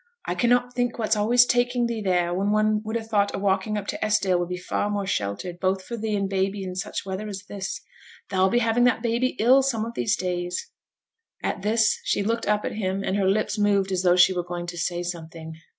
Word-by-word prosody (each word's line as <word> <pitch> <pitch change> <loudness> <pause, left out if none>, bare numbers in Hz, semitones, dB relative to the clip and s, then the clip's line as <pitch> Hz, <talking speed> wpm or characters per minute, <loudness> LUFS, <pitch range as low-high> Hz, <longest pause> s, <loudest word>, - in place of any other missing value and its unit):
'I - - -1
cannot 245 0 +2
think 245 -1 -1
what's 220 -1 +1
always 235 +4 +5
taking 245 0 +1
thee 235 -2 -2
there, 180 -3 +1
when 195 +3 0
one 215 0 +2
would 220 +1 -4
ha' 225 - -6
thought 205 -2 +1
a - - -3
walk 195 0 +1
up 210 -2 -2
to - - -4
Esdale 200 -4 +2
would 175 0 -2
be 180 - -3
far 195 +3 -2
more 205 -1 -2
sheltered, 140 - -3
both 190 0 0
for 235 - -6
thee 220 -1 -2
and 200 -1 0
baby 195 +1 -1
in 185 -1 -5
such 195 +2 -4
weather 195 +2 -4
as 195 -2 -6
this. 195 -1 -5 0.5
Thou'll 190 -1 +2
be 240 - +2
having 235 +2 +3
that 245 -2 +2
baby 240 +3 0
ill 255 +5 +5
some 235 -5 -1
of 230 - -6
these 215 -2 +1
days.' 180 -1 -3 0.7
At - - -2
this, 215 +1 +2
she 200 - 0
looked 230 +3 -1
up 210 0 +1
at - - -2
him, 195 -1 -2
and 190 - -1
her 195 -2 +2
lips 210 +1 0
moved 200 -2 +2
as 185 -1 0
though 180 -1 +4
she 180 +1 +6
were 175 -1 -2
going 175 0 -5
to 175 0 -6
say 175 +1 -2
something. 165 -2 -7
200 Hz, 235 wpm, -25 LUFS, 185-225 Hz, 0.7 s, she